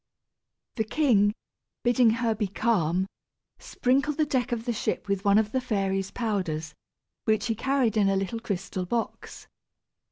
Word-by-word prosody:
The 220 - +2
king, 215 -5 +3 0.5
bidding 240 -1 +4
her 230 0 +1
be 210 -1 -1
calm, 185 -4 +1 0.5
sprinkled 275 +4 0
the 310 - +3
deck 255 -3 -1
of 235 -1 -2
the 240 - 0
ship 215 - -2
with 200 -1 -1
one 200 -1 +5
of 215 -1 +2
the 260 - 0
fairy's 195 -5 -1
powders, 175 -9 -2 0.5
which 215 -1 +2
he 230 - +1
carried 260 0 +1
in 205 -2 +3
a 195 - +2
little 195 +4 -2
crystal 190 -4 -4
box. 230 +3 -4
220 Hz, 155 wpm, -27 LUFS, 195-240 Hz, 0.5 s, one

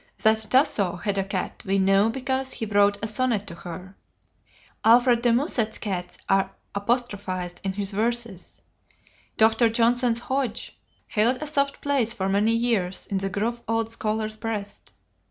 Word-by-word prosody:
That 220 0 +3
Tasso 210 - +2
had 200 +2 -2
a - - +1
cat 190 -1 -4
we 195 0 0
know 195 +2 +4
because 265 +2 -2
he 225 - -4
wrote 205 -1 +3
a - - 0
sonnet 220 -2 0
to 170 - -9
her. 180 +3 -9 0.9
Alfred 240 +1 +5
de 240 -1 +3
Musset's 235 -3 0
cats 185 -4 -4
are 195 0 +2 0.2
apostrophized 200 -5 -2
in 195 -1 -2
his 200 0 -1
verses. 225 -2 -2 0.7
Dr. 225 +1 +4
Johnson's 235 +1 +2
Hodge 260 -3 -3 0.3
held 235 +4 +1
a 305 - -4
soft 280 -2 0
place 260 -5 +1
for 190 -4 -2
many 210 +3 +2
years 220 -6 0
in 195 - +1
the 195 0 -2
gruff 225 +5 -2
old 225 0 0
scholar's 215 -1 -2
breast. 215 -2 -5
220 Hz, 155 wpm, -25 LUFS, 195-240 Hz, 0.9 s, Alfred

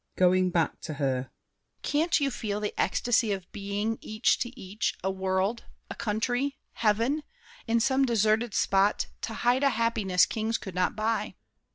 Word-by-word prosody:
[Going 185 0 +4
back 170 -2 0
to 155 - -5
her. 130 -3 -1 0.5
Can't 320 +4 +2
you 280 -1 +1
feel 210 -4 -3
The 210 0 -3
ecstasy 235 -2 +1
of 190 -2 -5
being, 205 +2 -2
each 215 +2 +1
to 245 +1 -4
each, 195 +2 -2
a 190 - +1
world, 190 +4 -1 0.3
A - - -5
country, 245 +6 -1 0.2
heaven; 230 +7 +1 0.5
in 230 +1 +3
some 265 +3 +2
deserted 220 -2 +2
spot 195 +1 +2 0.2
To 225 - -4
hide 245 +3 +2
a 280 - +4
happiness 220 -7 +2
kings 220 +3 -1
could 190 - -8
not 180 0 0
buy. 220 +1 -1
215 Hz, 160 wpm, -28 LUFS, 190-240 Hz, 0.5 s, Going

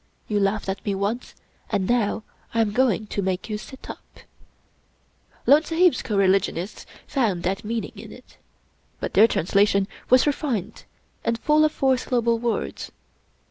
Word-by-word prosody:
You 210 -1 0
laughed 200 +1 0
at 195 0 -3
me 200 - -1
once, 205 +5 -3 0.3
and 200 -4 0
now 225 -2 +1 0.3
I 230 - +4
am 215 -2 +1
going 225 -3 +2
to 205 - -3
make 190 +2 -2
you 210 - -2
sit 265 +4 -12
up/' - - -11 1.2
Lone 295 +3 +6
Sahib's 330 -3 +3
coreligionists 195 -2 0 0.2
found 215 -11 0
that 195 +4 -1
meaning 225 +1 -3
in - - -10
it; - - -15 0.6
but - - -4
their 215 +3 +7
translation 200 0 +2 0.2
was 255 0 +6
refined 275 - -2 0.4
and 230 0 0
full 300 +6 +3
of 310 - +3
four 265 -3 +2
syllable 235 -2 0
words. 235 -1 -3
220 Hz, 150 wpm, -24 LUFS, 200-250 Hz, 1.2 s, their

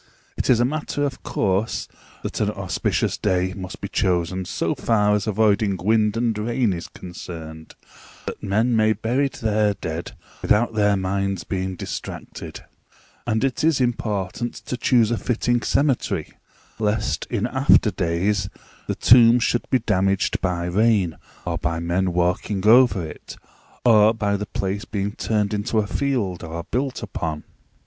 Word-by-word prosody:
It - - -2
is 120 -3 +5
a 120 - +4
matter 145 +1 -2
of 135 -2 -3
course 100 +2 -1 0.4
that - - -4
an - - +1
auspicious - - -1
day 95 0 0
must 95 -1 -8
be - - -3
chosen 90 0 0
so - - -1
far 105 -3 +2
as 105 0 0
avoiding 105 -2 +2
wind 105 +3 +2
and 115 -1 +1
rain 115 -1 +1
is 85 -1 -6
concerned, 80 -3 -9 0.5
that - - -6
men 110 +4 +1
may 110 0 +4
bury 125 +6 0
their 105 -4 0
dead 80 -1 -5 0.3
without 115 +3 +2
their 105 -2 +3
minds 95 0 -1
being 95 -1 -3
distracted; - - -7 0.6
and 110 +2 +1
it 135 +3 0
is 160 -3 +3
important 115 -2 -2
to - - -3
choose 120 -2 +3
a 120 - 0
fitting 120 0 0
cemetery, 140 0 0 0.5
lest 105 -9 -1
in - - -1
after - - +4
days 95 +4 0 0.4
the - - -1
tomb 120 0 +6
should 120 0 0
be 130 - +4
damaged 95 -4 0
by 90 -2 -1
rain, 100 -2 +2 0.3
or - - -2
by 85 0 -1
men 90 +2 0
walking 90 +3 0
over 115 -5 +5
it, 80 - -10 0.5
or 110 -1 +6
by 105 -2 0
the 105 0 -4
place 100 +1 -3
being 100 -1 -3
turned 105 -1 -1
into 105 +2 -1
a 110 - +2
field, 105 -8 -1
or 85 +1 -5
built 130 +2 -2
upon. 80 -2 -4
105 Hz, 155 wpm, -22 LUFS, 95-115 Hz, 0.6 s, tomb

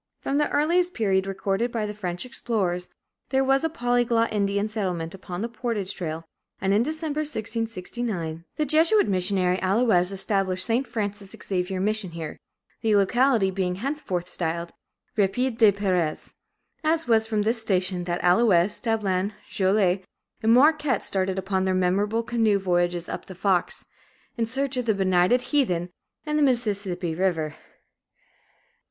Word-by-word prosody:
From 280 +2 -1
the 295 - +1
earliest 350 +4 +2
period 195 -4 +1
recorded 195 +4 -1
by 225 -3 -1
the 210 - -4
French 180 -1 -4
explorers, 195 -8 -2 0.4
there 265 0 +2
was 270 +1 +2
a 325 - +1
polyglot 245 -6 +1
Indian 200 0 0
settlement 180 -6 -3
upon 185 0 -6
the - - -1
portage 230 -5 -3
trail, 165 -2 -5 0.3
and 195 +1 +1
in 210 - +4
December, 310 +2 -2
1669, 220 - -3
the 305 - 0
Jesuit 320 - +4
missionary 185 -1 +1
Allouez 190 -2 +2
established 195 -2 -1
St. 240 +4 0
Francis 205 -2 -4
Xavier 185 0 -2
mission 210 0 0
here, 160 -2 -6 0.4
the 220 -2 +2
locality 220 0 +3
being 185 -1 -1
henceforth 200 - -3
styled 170 -1 -2 0.4
"Rapide 225 +4 0
des 220 -3 +7
Peres." 185 -6 -1 0.5
It 320 -1 +1
was 220 -1 +3
from 215 -2 0
this 225 +2 0
station 185 -4 0
that 175 0 -2
Allouez, 180 0 +4
Dablon, 205 -3 0 0.2
Joliet, 190 -1 +2 0.4
and 220 - +3
Marquette 290 -1 +4
started 190 -1 -1
upon 190 0 -1
their 190 0 +1
memorable 200 +5 +1
canoe 225 -3 +2
voyages 175 -2 0
up - - -6
the 190 - -9
Fox, 185 -1 0 0.5
in 230 -1 -1
search 265 +2 -1
of 250 - -1
benighted 195 +2 +3
heathen 180 -11 +1 0.3
and 300 0 0
the - - +4
Mississippi 200 - 0
River. 165 -3 0
200 Hz, 145 wpm, -25 LUFS, 185-240 Hz, 0.5 s, des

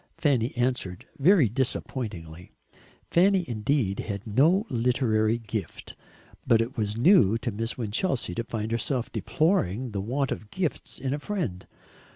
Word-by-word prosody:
Fanny 130 -6 +1
answered, 120 -7 -1
very 165 - +5
disappointingly. 100 - -3 0.6
Fanny 185 +1 +4
indeed 110 -2 0
had 100 +1 -4
no 155 - +3
literary 115 - +1
gift, 110 -2 -6 0.5
but 115 -3 +5
it 115 +4 -2
was 105 -3 -2
new 115 - +5
to 120 +1 -3
Miss 115 +3 -3
Winchelsea 120 - -1
to 115 - -2
find 110 -1 -4
herself 120 +2 -1
deploring 130 - 0
the 100 -2 -3
want 130 +7 -1
of 105 - -5
gifts 180 +1 -3
in 135 0 -2
a 145 - -2
friend. 145 - -4
120 Hz, 140 wpm, -27 LUFS, 105-140 Hz, 0.6 s, very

